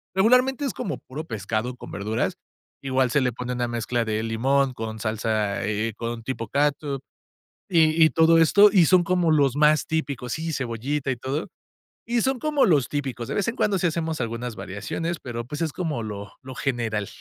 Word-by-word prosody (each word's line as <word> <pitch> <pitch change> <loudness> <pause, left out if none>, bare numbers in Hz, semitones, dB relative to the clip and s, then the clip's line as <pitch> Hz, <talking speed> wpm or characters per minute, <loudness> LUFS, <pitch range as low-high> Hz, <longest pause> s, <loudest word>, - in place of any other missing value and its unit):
Regularmente, 250 +7 +3
es 265 - -2
como 190 - -4
puro 150 +5 -8
pescado 110 +1 -3
con - - -11
verduras. 110 +3 -1 0.5
Igual, 130 -2 +1
se 145 - +3
le 125 -1 +1
pone 125 +1 -4
una 120 -1 -1
mezcla 120 0 -1
de 110 0 -1
limón 130 +4 +1
con 110 -1 -5
salsa, 110 -1 -1
eh, 110 +1 -1
con 115 0 -5
tipo 115 -2 -4
cátsup, 145 -1 0 0.7
y 160 -2 +4
y 160 - +5
todo 165 0 +5
esto. 200 +6 +7
Y 180 -6 +6
son, 185 -2 +5
como 175 -1 +1
los 140 -3 +3
más 150 0 +4
típicos. 140 -6 -2
Sí, 160 +1 -3
cebollita, 135 +2 -2
y 130 - -1
todo. 135 +6 -3 0.6
Y 235 0 +1
son, 265 0 0
como 300 -1 +2
los 145 -8 +3
típicos. 130 -5 -4
De - - -3
vez 205 - 0
en 230 - -1
cuando, 200 -2 +1
sí 175 - +2
hacemos 160 -3 -2
algunas 115 0 -4
variaciones, 100 - -4
pero 120 -2 -5
pues, 150 +6 -6
es 160 -4 -1
como 160 -9 -2
lo 105 -1 -6
lo 130 -1 -9
general. 120 -8 -1
135 Hz, 190 wpm, -24 LUFS, 115-160 Hz, 0.7 s, esto